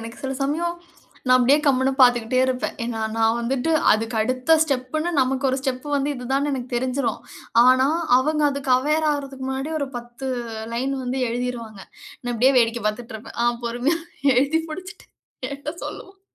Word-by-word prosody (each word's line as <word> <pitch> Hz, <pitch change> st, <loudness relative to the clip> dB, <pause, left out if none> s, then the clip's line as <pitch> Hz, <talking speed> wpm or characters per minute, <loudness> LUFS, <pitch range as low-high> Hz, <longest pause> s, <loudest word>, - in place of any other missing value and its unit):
எனக்கு 230 Hz, +2 st, -9 dB
சில 265 Hz, 0 st, -3 dB
சமயம் 335 Hz, +5 st, -1 dB, 0.5 s
நான் 255 Hz, -, +7 dB
அப்டியே 270 Hz, +4 st, +5 dB
கம்முனு 265 Hz, 0 st, +3 dB
பாத்துக்கிட்டே 245 Hz, 0 st, +4 dB
இருப்பேன். 255 Hz, -1 st, -2 dB
ஏன்னா 230 Hz, -2 st, -3 dB, 0.2 s
நான் 225 Hz, 0 st, +3 dB
வந்துட்டு 255 Hz, +5 st, -1 dB, 0.2 s
அதுக்கு 225 Hz, +2 st, -1 dB
அடுத்த 255 Hz, +7 st, +2 dB
ஸ்டெப்புன்னு, 290 Hz, +4 st, -2 dB
நமக்கு 265 Hz, +1 st, 0 dB
ஒரு 260 Hz, -, 0 dB
ஸ்டெப் 265 Hz, 0 st, -3 dB
வந்து 280 Hz, +1 st, 0 dB
இதுதான்னு 270 Hz, +4 st, -1 dB
எனக்கு 255 Hz, -2 st, -4 dB
தெரிஞ்சிடும். 255 Hz, -1 st, -1 dB, 0.4 s
ஆனா, 255 Hz, +1 st, +5 dB, 0.3 s
அவங்க 305 Hz, +3 st, 0 dB
அதுக்கு 280 Hz, -1 st, -4 dB
அவேர் 305 Hz, +4 st, +1 dB
ஆகுறதுக்கு 275 Hz, -2 st, -4 dB
முன்னாடி 265 Hz, +3 st, -3 dB
ஒரு 280 Hz, -, -2 dB
10 240 Hz, +2 st, -8 dB, 0.5 s
லைன் 260 Hz, +4 st, -1 dB
வந்து 250 Hz, +2 st, -2 dB
எழுதிருவாங்க. 235 Hz, -3 st, -4 dB, 0.4 s
நான் 245 Hz, -1 st, -3 dB
அப்டியே 250 Hz, +4 st, +4 dB
வேடிக்கை 235 Hz, 0 st, +1 dB
பாத்துட்டு 225 Hz, +2 st, -3 dB
இருப்பேன். 220 Hz, -, -12 dB
ஆ -, -, +3 dB, 0.2 s
பொறுமையா 245 Hz, +7 st, 0 dB, 0.4 s
எழுதி 280 Hz, +6 st, +2 dB
முடிச்சிட்டு 370 Hz, +5 st, -9 dB, 0.4 s
என்கிட்ட 285 Hz, +2 st, -5 dB
சொல்லுவான். 385 Hz, 0 st, -9 dB
260 Hz, 160 wpm, -23 LUFS, 240-280 Hz, 0.5 s, நான்